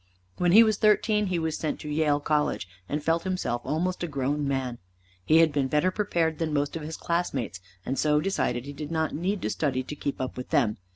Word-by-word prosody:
When 175 -1 +2
he 220 +5 +9
was 215 -2 +2
thirteen 210 0 +3
he 180 -1 0
was 160 -1 -1
sent 155 - -3
to - - -7
Yale 150 -1 +2
College, 150 - 0 0.2
and 145 +1 -2
felt 165 +2 +2
himself 185 -10 -2
almost 180 +4 -1
a 175 - -1
grown 140 0 -1
man. 130 -3 -2 0.4
He 155 - +4
had 165 -1 +5
been 140 -2 0
better 150 +7 +2
prepared 170 -6 0
than 160 -2 -1
most 145 +1 0
of 165 - -4
his 155 +2 -6
classmates, 145 - -2 0.3
and 135 - -2
so 150 -1 +3
decided 130 -9 -1
he 145 - -7
did 150 +1 -6
not 160 -2 -1
need 185 +6 -2
to - - 0
study 130 -4 -1
to 150 - -7
keep 140 -1 -4
up 130 -1 -4
with 125 - -6
them. 110 -6 +2
155 Hz, 225 wpm, -27 LUFS, 140-175 Hz, 0.4 s, he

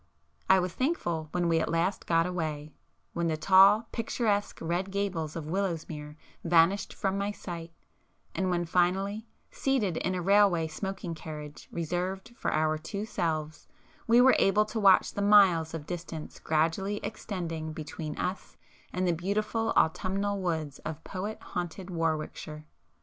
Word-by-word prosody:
I 190 - +7
was 180 -1 -1
thankful 175 - -1
when 175 0 0
we 165 -1 +3
at - - -1
last 170 +4 0
got 165 0 +3
away,—when 160 0 -5
the 160 -1 0
tall, 195 +6 +6
picturesque 220 -3 -1
red 175 +4 -2
gables 190 -6 -2
of 165 -3 -4
Willowsmere 160 -4 -3 0.3
vanished 170 +3 +3
from 195 0 -1
my 200 +1 -1
sight,—and 175 +1 -7
when 175 -1 0
finally, 195 +6 0 0.2
seated 220 -11 0
in 185 - -1
a 180 - -2
railway 195 -4 +4
smoking 185 +1 -5
carriage 150 -2 -9
reserved 180 +6 -3
for - - -2
our 155 0 +1
two 200 +6 -5
selves, 155 -7 -3 0.4
we 235 +1 +6
were 260 +1 +7
able 210 +2 +4
to 215 +1 -4
watch 195 -3 +5
the 205 - -3
miles 190 -6 +5
of 150 -2 -6
distance 170 -2 -6
gradually 165 +6 0
extending 165 -7 -4
between 155 -1 -6
us 185 +1 -4 0.3
and 185 0 -1
the 175 - +3
beautiful 215 +6 -1
autumnal 195 +4 +1
woods 160 -6 -2
of 160 0 -6
poet 200 +3 -5
haunted 180 +2 -5
[p - - -6
384] - - -5
Warwickshire. 155 -1 -3
180 Hz, 150 wpm, -29 LUFS, 160-200 Hz, 0.4 s, I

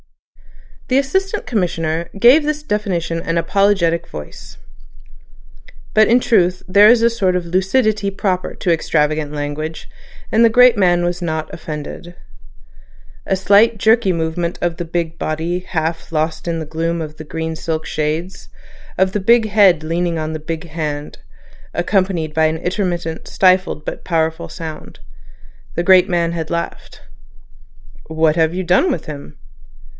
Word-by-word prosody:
The 255 - +2
Assistant 380 +9 -1
Commissioner 170 -7 -2
gave 255 +8 +6
this 300 0 -2
definition 190 - -2
in - - -9
an 165 0 0
apologetic 170 -1 +1
voice. 75 -1 -10 1.4
But 215 0 +5
in 240 +2 +5
truth 180 -7 +1
there 205 +3 +6
is 240 0 +5
a 230 - +4
sort 195 -6 0
of 180 -1 -2
lucidity 200 +4 +1
proper 190 -2 -2
to 175 - +1
extravagant 155 -2 0
language, 150 +2 -5 0.4
and 225 - +4
the 230 - +6
great 250 +1 +6
man 175 -4 +2
was 175 +1 -2
not 160 -2 -3
offended. 160 +2 -7 1.1
A - - +2
slight 205 +4 +4
jerky 220 -1 +3
movement 170 +1 -2
of 170 -1 -2
the - - -3
big 170 -1 -3
body 160 +3 -2
half 165 -3 -4
lost 155 0 -2
in 165 -1 -1
the 160 - -5
gloom 165 +2 -2
of 155 -1 -6
the 155 - -8
green 160 +1 -4
silk 160 0 -3
shades, 155 +4 -3 0.5
of 190 0 +2
the 210 - 0
big 230 +2 +4
head 195 -7 +4
leaning 170 +1 -1
on 155 0 -3
the 155 - -4
big 165 +2 -6
hand, 150 -2 -5 0.6
accompanied 175 -4 -1
an 160 0 +2
intermittent 175 -2 -3
stifled 185 -5 +2
but - - -6
powerful 160 -2 -1
sound. 160 -3 -8 0.8
The 170 - 0
great 185 +1 +5
man 170 -2 0
had 160 -2 -4
laughed. 170 0 -5 1.1
"What 160 0 +1
have 160 -1 +2
you 185 +1 -3
done 185 - +3
with - - -4
him?" 140 - -9
170 Hz, 150 wpm, -18 LUFS, 160-195 Hz, 1.4 s, gave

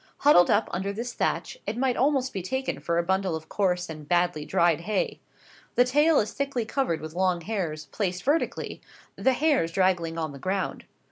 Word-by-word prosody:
Huddled 280 -12 +6
up 205 +2 +3
under 190 +3 -2
this 235 +4 -5
thatch, - - -2
it 225 - -2
might 255 -1 +1
almost 265 -1 +1
be 190 - -3
taken 260 +9 -3
for 170 - -1
a 170 - +2
bundle 190 -1 0
of 160 0 -8
coarse 180 -3 0
and 155 -2 -9
badly 175 -3 +1
dried 170 -1 +2
hay. 200 +2 -1 0.6
The 245 - +5
tail 295 +5 +4
is 210 - -1
thickly 275 -4 -2
covered 220 - -1
with 155 0 -7
long 180 -1 +1
hairs, 165 -6 -3
placed 180 +3 -3
vertically, 300 +4 -1 0.3
the 265 - +2
hairs 275 - +2
draggling 175 -3 +1
on 160 -2 -2
the 140 - -10
ground. 190 +3 -2
190 Hz, 190 wpm, -26 LUFS, 170-250 Hz, 0.6 s, Huddled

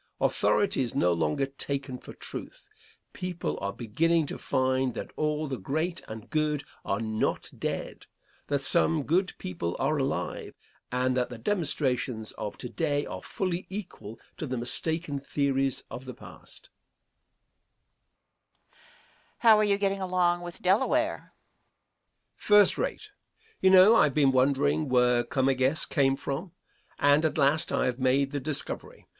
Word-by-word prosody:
Authority 200 -8 +2
is 120 -3 -3
no 90 0 +3
longer 135 - 0
taken 135 -1 -4
for - - -11
truth. - - -8 0.5
People 180 -2 -4
are 100 0 -2
beginning 155 +10 +1
to - - -5
find 130 -2 0
that - - -6
all 150 0 -1
the 135 -5 -4
great 160 - -2
and 110 +1 -8
good 150 -1 0 0.2
are 100 - -1
not 110 -1 -2
dead - - -5 0.4
that 140 -1 0
some 160 +1 +3
good 180 +6 +1
people 85 -1 -4
are 155 - 0
alive, 135 0 -3 0.4
and 125 +1 +1
that 125 -1 0
the 120 - -7
demonstrations 130 - -1
of 105 - -6
to 125 - -6
day 145 +1 -1
are - - -6
fully 185 -1 -3
equal 185 - -8 0.2
to 155 - -4
the 130 -1 -3
mistaken 145 +5 -2
theories 135 -1 0
of 125 - -7
the 130 - -8
past. - - -15 2.0
Question. - - -30 0.6
How 225 -3 +6
are - - +4
you 200 -1 +2
getting 195 -1 0
along 180 -2 +1
with 175 -1 -8
Delaware? 265 - +2
Answer. - - -22 1.1
First 205 -2 +5
rate. - - -3 0.5
You 190 - +5
know 190 +4 +8
I - - +6
have 140 - -2
been 140 -3 +4
wondering 140 +3 +2
where 125 -1 +3
Comegys 130 +3 +1
came 135 -2 +2
from, 155 +6 -5 0.4
and 145 +2 +4
at 160 -1 0
last 150 +3 +2
I - - +1
have 125 0 -1
made 135 +2 +2
the 145 - -2
discovery. 145 +1 -5
140 Hz, 150 wpm, -28 LUFS, 130-170 Hz, 2.0 s, know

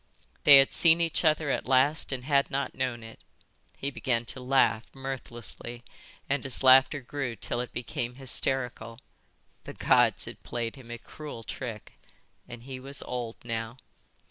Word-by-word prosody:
They 145 -2 +11
had 135 0 +5
seen 165 -1 +5
each 165 0 0
other 155 -2 +2
at - - -2
last 135 +5 +3
and 130 -2 -3
had 140 -1 +2
not 140 +1 -2
known 125 -3 -3
it. 115 0 -12 0.6
He 140 - -3
began 120 -3 -1
to - - -10
laugh, 125 -3 +2
mirthlessly, 120 -2 -4 0.4
and 140 0 0
his 135 -1 0
laughter 130 +2 +6
grew 125 -1 -4
till 120 +1 -2
it 125 -1 -7
became 120 0 -4
hysterical. 130 -3 -2 0.7
The - - -7
Gods - - +3
had - - -10
played 115 0 -4
him 130 -4 -14
a 120 - -5
cruel 130 0 -9
trick. 115 -3 -8 0.5
And 120 -1 -10
he 130 0 -7
was 140 +2 -5
old 120 -2 -5
now. 115 0 -4
130 Hz, 160 wpm, -28 LUFS, 120-140 Hz, 0.7 s, They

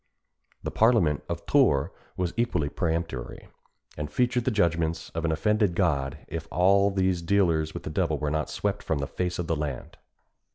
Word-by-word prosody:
The - - -3
parliament 110 - +3
of - - -4
Tours 70 +5 +3 0.3
was 90 -2 -1
equally 90 -11 0
peremptory, 80 -6 -3 0.5
and 75 0 -5
feared 125 +3 +1
the - - +3
judgments 85 -6 0
of 80 0 -3
an 80 - +1
offended 105 +3 +1
God 70 -8 0
if 80 0 -5
all 100 +3 +4
these 95 -2 +1
dealers 85 -4 +1
with - - -5
the - - -5
devil - - 0
were 75 -1 -2
not 75 0 -1
swept 100 0 -2
from 80 - -1
the 70 - -2
face 90 +4 -3
of 90 - -2
the 80 - 0
land. 75 -4 -5
85 Hz, 175 wpm, -27 LUFS, 80-100 Hz, 0.5 s, all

